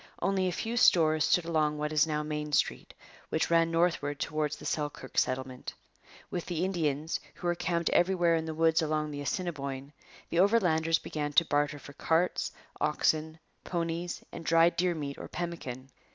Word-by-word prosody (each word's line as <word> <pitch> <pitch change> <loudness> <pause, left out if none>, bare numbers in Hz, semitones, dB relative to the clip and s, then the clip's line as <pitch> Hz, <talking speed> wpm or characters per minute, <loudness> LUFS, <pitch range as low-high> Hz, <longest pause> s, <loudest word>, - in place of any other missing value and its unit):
Only 195 -1 +1
a - - 0
few 225 +6 -3
stores 155 -7 +5
stood 175 - +2
along 155 -2 +1
what 150 +1 -2
is 155 +1 +4
now 150 -1 -1
Main 150 0 -4
Street, - - 0 0.3
which 160 - 0
ran 165 0 +4
northward 165 -4 +1
towards 150 -1 -1
the - - -12
Selkirk 145 -3 -3
Settlement. 130 0 -1 0.6
With 175 - -4
the 175 0 -1
Indians, 160 -4 -1 0.2
who - - -10
were 175 - +3
camped 170 -1 -1
everywhere 175 -2 +3
in 160 0 -1
the 160 -1 -4
woods 165 0 +3
along 155 -1 -1
the 145 0 -5
Assiniboine, 140 -4 -4 0.4
the 170 - +1
Overlanders 175 -6 +3
began 145 -2 -4
to 170 - +5
barter 145 0 0
for 145 0 -12
carts, 165 +5 0 0.3
oxen, 155 +1 +1 0.3
ponies, 170 0 -3
and 170 - -8
dried 165 +1 +4
deer 175 -1 +1
meat 140 -3 -5
or - - -7
pemmican. 135 -7 -6
160 Hz, 170 wpm, -30 LUFS, 150-170 Hz, 0.6 s, stores